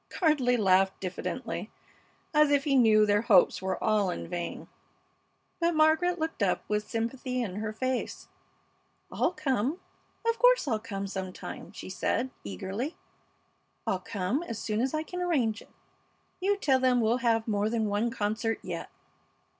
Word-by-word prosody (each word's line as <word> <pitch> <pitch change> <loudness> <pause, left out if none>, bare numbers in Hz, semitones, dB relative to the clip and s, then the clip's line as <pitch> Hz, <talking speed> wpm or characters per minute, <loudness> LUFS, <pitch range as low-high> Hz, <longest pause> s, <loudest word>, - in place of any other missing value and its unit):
Gardley 280 -8 +2
laughed 190 -2 +3
diffidently, 185 -1 -4 0.6
as 300 -1 +5
if 285 -1 +3
he 285 -2 +2
knew 220 -4 +6
their 205 0 +3
hopes 205 -7 +4
were 190 0 -1
all 210 -3 +2
in 175 - -4
vain. 175 0 -5 0.9
But 340 -1 +2
Margaret 315 +3 +3
looked 320 -6 -3
up 190 -3 +1
with 210 0 -1
sympathy 250 +3 -2
in 195 -4 -5
her 215 0 -2
face, 255 +3 -3 0.8
"I'll - - +1
come! 280 - -1 0.5
Of 460 0 +1
course - - +5
I'll 220 -5 +1
come 200 -3 -5
some 190 -1 -4
time," - - -8
she - - -9
said, 260 - -1
eagerly. 190 - -4 0.9
"I'll 190 - 0
come 200 - -2
as 230 -11 -5
soon 215 0 -1
as 265 +4 0
I 310 - -1
can 360 +2 -6
arrange 255 -12 +1
it. - - -17 0.7
You 400 +2 +1
tell 270 -9 +3
them 255 -1 +3
we'll 230 +1 +2
have 230 -2 +1
more 210 -1 +1
than 225 -1 0
one 210 +3 0
concert 225 0 -1
yet." - - -5
230 Hz, 160 wpm, -29 LUFS, 205-285 Hz, 0.9 s, knew